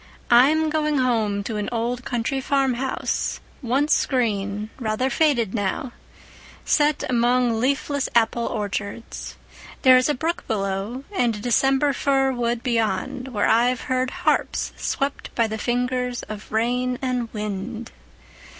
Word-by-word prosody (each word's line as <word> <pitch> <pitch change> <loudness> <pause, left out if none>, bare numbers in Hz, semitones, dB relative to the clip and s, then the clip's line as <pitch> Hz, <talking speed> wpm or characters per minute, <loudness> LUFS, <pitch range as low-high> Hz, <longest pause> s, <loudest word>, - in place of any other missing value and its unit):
I'm 305 +6 +5
going 305 -1 +1
home 220 -6 +1
to 215 +1 -4
an 210 - -2
old 240 +1 -2
country 250 +3 -1
farmhouse, 265 -1 -1 0.2
once 270 +4 +2
green, 210 -4 -1
rather 240 +3 -1
faded 240 -8 +2
now, 210 +4 -2 0.7
set 295 -1 +2
among 245 -1 +2
leafless 280 +2 0
apple 235 0 +2
orchards. 205 +1 -4 0.5
There 255 -2 +8
is 255 +3 +2
a 295 - +2
brook 325 +6 -3
below 200 +4 -2
and 240 - +2
a - - -7
December 270 +5 +2
fir 270 0 +2
wood 240 -1 -1
beyond, 240 +2 -1
where 215 -6 0
I've 240 +2 +3
heard 255 0 0 0.2
harps - - +1
swept 275 +1 -3
by 230 - +3
the 220 0 -4
fingers 250 +1 -1
of 215 -1 -9
rain 250 +3 0
and 250 -3 -1
wind. 215 +2 -5
245 Hz, 130 wpm, -23 LUFS, 220-265 Hz, 0.7 s, There